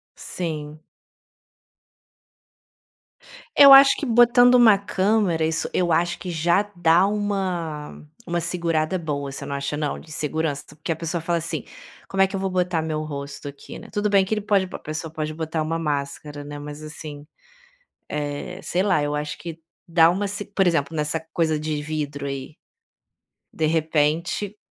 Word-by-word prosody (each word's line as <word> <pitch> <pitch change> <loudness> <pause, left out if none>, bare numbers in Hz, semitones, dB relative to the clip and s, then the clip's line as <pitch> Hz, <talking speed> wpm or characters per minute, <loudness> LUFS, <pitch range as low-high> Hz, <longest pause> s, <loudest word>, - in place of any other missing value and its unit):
Sim. 155 -3 -5 2.7
Eu 280 -1 +9
acho 275 0 +9
que - - -3
botando 245 +1 +6
uma 230 -5 +7
câmera, 195 -4 +1
isso 160 0 -1
eu 175 -2 +1
acho 175 +2 +1
que 180 - -6
já 170 +5 +2
dá 175 +1 +4
uma 185 -8 -3 0.2
uma 175 -1 -1
segurada 170 0 -1
boa. 145 -4 -4
Você 140 +1 -7
não 140 - -5
acha, 140 +1 -3
não? 150 -1 -2
De 160 - -15
segurança? 155 -1 -2
Porque 155 +2 -4
a - - 0
pessoa 165 +1 -3
fala 170 +1 0
assim: 165 - -3 0.4
“Como 195 - 0
é - - +3
que 195 - -6
eu - - -2
vou 190 0 -1
botar 180 -3 0
meu 155 -1 -2
rosto 140 -1 -7
aqui, 140 0 -9
né?” - - -12
Tudo 210 0 0
bem 195 -1 +4
que 205 - -2
ele 215 - -1
pode 200 -2 +2
b 185 - -9
a - - -6
pessoa 155 +1 -5
pode 155 -1 -3
botar 160 0 -2
uma 160 +1 -1
máscara, 145 -1 -3
né, 145 0 -8
mas, 145 +1 -8
assim, 150 -1 -9 0.8
eh, 150 +5 -4
sei 180 +2 0
lá. 185 -7 +2
Eu 145 0 -1
acho 150 0 -3
que 165 -1 -8 0.3
dá 165 -1 +5
uma 190 +4 0
s 205 +1 -3
por 195 -2 +1
exemplo, 160 -2 +1
nessa 150 +1 -1
coisa 160 -2 +1
de 155 -1 -3
vidro 145 -2 -4
aí, 135 +2 -6 1.0
de 155 - 0
repente 160 +5 0
160 Hz, 170 wpm, -23 LUFS, 150-185 Hz, 2.7 s, Eu